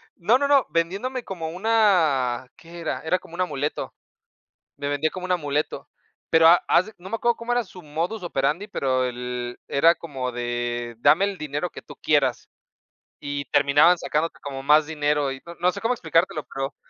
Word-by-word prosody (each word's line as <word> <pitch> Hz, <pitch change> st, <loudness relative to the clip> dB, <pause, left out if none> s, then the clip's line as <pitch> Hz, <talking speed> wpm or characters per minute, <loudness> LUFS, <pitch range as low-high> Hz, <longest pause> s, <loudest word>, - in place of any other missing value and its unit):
No, 220 Hz, +8 st, +3 dB
no, 280 Hz, -, 0 dB
no, 280 Hz, -3 st, +4 dB
vendiéndome 200 Hz, +10 st, -1 dB
como 165 Hz, -4 st, -5 dB
una, 165 Hz, -, +2 dB
¿qué 170 Hz, +1 st, -12 dB
era? 170 Hz, -, -3 dB
Era 180 Hz, +3 st, 0 dB
como 170 Hz, -, -17 dB
un 185 Hz, -, -2 dB
amuleto. 150 Hz, -4 st, -2 dB, 0.8 s
Me 145 Hz, 0 st, -4 dB
vendía 145 Hz, +2 st, 0 dB
como 185 Hz, +1 st, -7 dB
un 185 Hz, -, -3 dB
amuleto, 150 Hz, -4 st, -1 dB, 0.4 s
pero 160 Hz, 0 st, +6 dB
a 175 Hz, -, +9 dB
haz 185 Hz, -, +4 dB
de 220 Hz, -, -11 dB
no 185 Hz, +2 st, -11 dB
me 225 Hz, -, -1 dB
acuerdo 235 Hz, +1 st, +1 dB
cómo 235 Hz, +1 st, -2 dB
era 245 Hz, 0 st, +1 dB
su 185 Hz, -3 st, -13 dB
modus 170 Hz, +7 st, -3 dB
operandi, 155 Hz, +5 st, -1 dB
pero 130 Hz, -9 st, 0 dB
el, 125 Hz, 0 st, -5 dB
era 165 Hz, +5 st, +4 dB
como 135 Hz, -6 st, -5 dB
de 120 Hz, 0 st, -3 dB
dame 160 Hz, +10 st, +5 dB
el 200 Hz, -2 st, -4 dB
dinero 150 Hz, +3 st, -3 dB
que -, -, -10 dB
tú -, -, -13 dB
quieras, -, -, +1 dB, 0.7 s
y 145 Hz, 0 st, -4 dB
terminaban 145 Hz, +7 st, +4 dB
sacándote 165 Hz, 0 st, -2 dB
como 135 Hz, -1 st, -6 dB
más 150 Hz, +2 st, +5 dB
dinero 150 Hz, -2 st, 0 dB
y 135 Hz, 0 st, -7 dB
no 170 Hz, 0 st, -9 dB
no 180 Hz, +2 st, +2 dB
sé 200 Hz, -, -7 dB
cómo 230 Hz, +4 st, +1 dB
explicártelo, 165 Hz, -6 st, 0 dB
pero 135 Hz, +1 st, -4 dB
160 Hz, 190 wpm, -24 LUFS, 140-185 Hz, 0.8 s, a